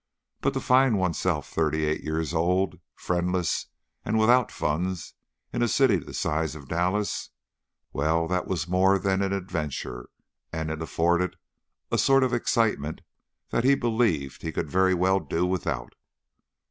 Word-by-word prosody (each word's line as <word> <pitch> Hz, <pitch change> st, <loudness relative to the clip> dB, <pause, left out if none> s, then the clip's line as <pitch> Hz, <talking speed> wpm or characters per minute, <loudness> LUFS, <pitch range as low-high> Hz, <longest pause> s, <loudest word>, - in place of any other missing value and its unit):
But -, -, 0 dB
to -, -, +1 dB
find 130 Hz, -3 st, +4 dB
oneself 90 Hz, -4 st, 0 dB
thirty 80 Hz, -1 st, 0 dB
eight 75 Hz, 0 st, -1 dB
years 80 Hz, +1 st, -2 dB
old, 90 Hz, +2 st, +1 dB, 0.2 s
friendless 90 Hz, 0 st, -1 dB, 0.4 s
and 110 Hz, -, 0 dB
without 120 Hz, +2 st, +4 dB
funds 90 Hz, +4 st, -2 dB, 0.4 s
in 120 Hz, -, -1 dB
a 120 Hz, -, +3 dB
city 115 Hz, -3 st, +4 dB
the -, -, -8 dB
size 80 Hz, 0 st, -1 dB
of 70 Hz, -3 st, -11 dB
Dallas 90 Hz, +6 st, -1 dB, 0.6 s
well, 80 Hz, +3 st, +1 dB
that 90 Hz, +1 st, -1 dB
was 85 Hz, -4 st, -2 dB
more 95 Hz, +2 st, +4 dB
than 95 Hz, 0 st, 0 dB
an 100 Hz, -1 st, 0 dB
adventure, 80 Hz, -10 st, -4 dB, 0.4 s
and 80 Hz, -1 st, -3 dB
it 80 Hz, 0 st, -4 dB
afforded 85 Hz, +2 st, +1 dB, 0.6 s
a -, -, +2 dB
sort 135 Hz, 0 st, +5 dB
of 130 Hz, -1 st, 0 dB
excitement 105 Hz, -10 st, 0 dB, 0.5 s
that 115 Hz, -, +1 dB
he 135 Hz, +2 st, +5 dB
believed 110 Hz, -, 0 dB
he 80 Hz, -, -3 dB
could 80 Hz, -2 st, -3 dB
very 95 Hz, 0 st, +3 dB
well 95 Hz, +2 st, +3 dB
do 90 Hz, -1 st, -1 dB
without. 90 Hz, -9 st, -2 dB
90 Hz, 150 wpm, -26 LUFS, 80-100 Hz, 0.6 s, sort